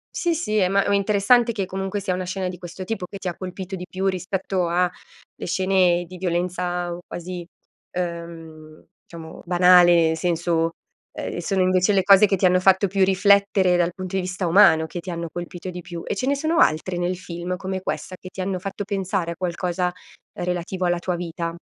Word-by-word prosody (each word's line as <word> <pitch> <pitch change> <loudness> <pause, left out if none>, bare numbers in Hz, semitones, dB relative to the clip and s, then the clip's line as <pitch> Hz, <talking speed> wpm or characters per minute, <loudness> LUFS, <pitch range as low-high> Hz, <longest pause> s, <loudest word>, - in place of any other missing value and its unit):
Sì, 345 -1 +1
sì, 305 -10 -1
eh, 185 -3 +3
ma 200 +1 +3
ma 200 - +3
interessante 210 +4 +3
che 205 -4 -2
comunque 195 +2 -3
sia 190 -2 -2
una 185 0 -2
scena 185 +1 -3
di 180 0 -6
questo 175 +2 -8
tipo 185 -2 -4
che 200 - -9
ti 195 - -6
ha 175 - -3
colpito 185 +1 -6
di 180 -1 -7
più 190 +1 -3
rispetto 185 -1 -1
a 180 +1 +2 0.5
le - - -7
scene 185 -1 +2
di 180 +1 -10
violenza 175 0 -2
quasi, 175 0 -7 0.5
ehm, 165 -3 -7 0.2
diciamo 165 -1 -11
banale, 175 -1 +6
nel 160 0 0
senso, 165 -1 0 0.4
ehm, - - -5
sono 190 +2 0
invece 185 +2 +3
le 195 - +4
cose 195 +2 +7
che 200 - +1
ti 190 - +1
hanno 180 0 +3
fatto 190 +1 +4
più 195 +1 +1
riflettere 195 -1 +4
dal 175 0 +1
punto 185 -1 -6
di 190 - +1
vista 180 0 -3
umano 165 -3 +5
che 175 - -6
ti 180 - -6
hanno 170 0 -4
colpito 175 +1 -6
di 180 0 -6
più. 170 -1 -7
E - - -2
ce 225 - -2
ne 280 +2 +2
sono 315 +4 -1
altre 175 - +2
nel 175 +1 -1
film 175 0 -5
come 190 0 -4
questa, 185 - -4
che 185 - -11
ti 190 - -7
hanno 185 0 -2
fatto 195 +2 -5
pensare 190 -3 -2
a - - -5
qualcosa 180 0 -2 0.4
relativo 180 +1 -3
alla 175 0 +1
tua 180 0 -2
vita? 170 -1 -4
180 Hz, 205 wpm, -23 LUFS, 175-195 Hz, 0.5 s, cose